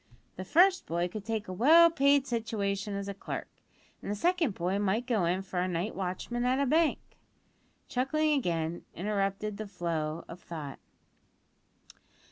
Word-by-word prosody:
The 185 - -5
first 365 - +4
boy 170 +1 0
could 210 +3 -6
take 220 -1 -3
a 185 - -5
well 325 - +7
paid 280 -3 +4
situation 210 -4 -2
as 200 0 -4
a 200 - -3
clerk, 195 - -6 0.5
an - - -6
the 205 - -1
second 325 - +1
boy 180 +3 -1
might 205 +4 0
go 225 -8 +1
in 180 +3 0
for 180 -1 -2
night 180 +4 -2
watchman 195 +6 -3
at 250 +1 +2
a 280 - +2
bank." 315 +4 +3 0.9
(Chuckling 305 +5 +1
again 170 - -1
interrupted 200 +1 -2
the 215 0 -5
flow 165 -4 -3
of 170 - -9
thought.) 150 -5 -7
200 Hz, 155 wpm, -30 LUFS, 180-255 Hz, 0.9 s, well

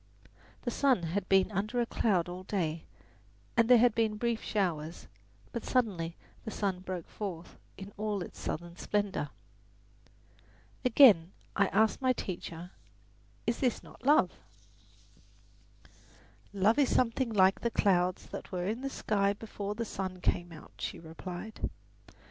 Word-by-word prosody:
The 240 - -1
sun 260 -8 +3
had 185 +4 -2
been 195 +1 +4
under 210 +5 -1
a 240 - +2
cloud 190 -7 +1
all 180 +1 -6
day, 170 -5 -2 0.7
and 230 0 +4
there 250 - +9
had 240 0 +5
been 220 -1 +1
brief 235 0 0
showers; 170 -6 -2 0.5
but 235 - -4
suddenly 185 -10 0 0.3
the - - -5
sun 195 -4 -1
broke 185 -2 -5
forth 180 -5 -6 0.2
in 195 +1 -9
all 210 -2 -1
its - - -11
southern 170 +2 -4
splendour. 205 -9 -1 1.5
Again 220 - +7 0.2
I 200 - +4
asked 220 +7 +2
my 255 -1 +3
teacher, 175 -4 -6 0.7
"Is 230 - 0
this 250 -4 0
not - - -15
love?" 290 +3 +5 2.2
"Love 205 +6 +3
is 275 - +4
something 245 0 +1
like 190 -2 +4
the 235 - +1
clouds 185 -5 +2
that - - -8
were 180 -1 -2
in 220 +6 -2
the 275 - -2
sky 200 -6 +1
before 205 -1 -5
the 230 +1 -2
sun 190 -3 -4
came 175 0 0
out," 160 -2 -12
she - - -3
replied. 175 +5 -6
200 Hz, 145 wpm, -31 LUFS, 180-230 Hz, 2.2 s, there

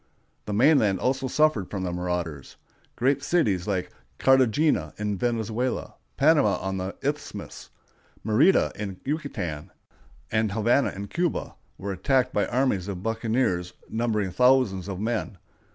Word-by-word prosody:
The 105 - -3
mainland 110 -4 +4
also 130 +1 0
suffered 140 -8 +2
from 95 -2 -4
the 90 - -2
marauders. 90 -5 -4 0.4
Great 135 +3 +1
cities, 110 - +1
like 95 -3 -2 0.3
Cartagena 130 - +3
in 105 -1 -2
Venezuela, 115 +3 -2 0.2
Panama 145 -8 +4
on 95 0 -3
the 95 +1 -4
Isthmus, 145 +2 -5 0.6
Mérida 135 - +3
in 100 -3 -6
Yucatan, 115 - -4 0.6
and 110 -2 +1
Havana 115 +5 +2
in 100 +1 -7
Cuba, 175 - -2 0.2
were 100 +1 -4
attacked 130 +6 +1
by 105 - +1
armies 120 -7 0
of 95 -2 -5
buccaneers 110 -5 0 0.2
numbering 110 -4 0
thousands 125 -4 +3
of 95 -2 -5
men. 110 -2 -2
110 Hz, 130 wpm, -26 LUFS, 95-130 Hz, 0.6 s, mainland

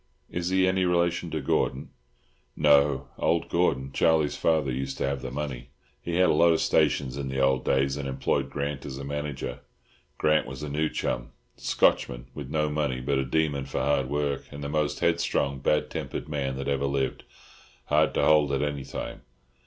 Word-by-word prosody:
Is 85 0 -2
he 95 0 +3
any 95 0 +2
relation 85 -1 +1
to 80 -1 -3
Gordon?" 65 0 -1 0.6
"No; 70 -3 +3
old 85 0 +1
Gordon—Charlie's 75 -1 +2
father—used 70 -4 0
to - - -1
have 70 -1 -2
the 65 - -5
money. 65 -2 -5 0.3
He 85 - -3
had 90 +1 +4
a - - +3
lot 85 +2 +5
of 80 - +1
stations 70 -3 +2
in 70 -1 -3
the 65 0 -3
old 65 -1 +2
days, 70 +1 +1
and 70 -1 -4
employed 65 0 -1
Grant 70 -1 -3
as 65 -1 -6
a 70 - -6
manager. 70 -3 -4 0.6
Grant 75 -2 +2
was 65 +3 -7
a 75 - -4
new 75 +2 0
chum - - -3 0.2
Scotchman - - +1
with 70 -3 -7
no 75 0 +1
money, 75 -4 -1
but 65 +2 0
a - - +1
demon 70 0 0
for - - -3
hard 70 -1 +1
work, 75 0 -1
and 70 0 -7
the 70 - -3
most 75 0 -1
headstrong, 85 -5 +1
bad 75 +3 +1
tempered - - -4
man 70 -3 -2
that 70 0 -4
ever 70 0 0
lived—hard 70 +1 -2
to - - +3
hold 75 -2 +4
at 70 +1 +1
any 70 -2 -2
time. - - -6
70 Hz, 185 wpm, -27 LUFS, 65-75 Hz, 0.6 s, lot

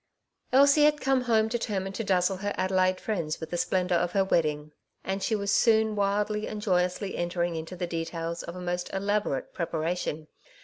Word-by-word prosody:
Elsie 280 +3 +6
had 300 0 +3
come 270 -1 +2
home 220 -2 +3
determined 205 -5 -2
to 225 - -3
dazzle 190 -1 +1
her 205 +2 -3
Adelaide 185 0 +2
friends 170 -8 -2
with 160 -1 -7
the 175 - -1
splendour 180 -1 +1
of 175 0 -1
her 195 -1 +3
wedding, 150 -4 0 0.3
and 195 +1 -3
she 220 - 0
was 200 -1 -1
soon 220 -1 +3
wildly 210 +1 0
and 215 - -5
joyously 185 0 0
entering 175 0 -1
into 160 +3 -6
the 180 0 -3
details 165 0 -4
of 170 - -8
a 180 - -7
most 180 0 -3
elaborate 200 -8 -1
preparation. 165 -2 -2
185 Hz, 180 wpm, -28 LUFS, 175-210 Hz, 0.3 s, Elsie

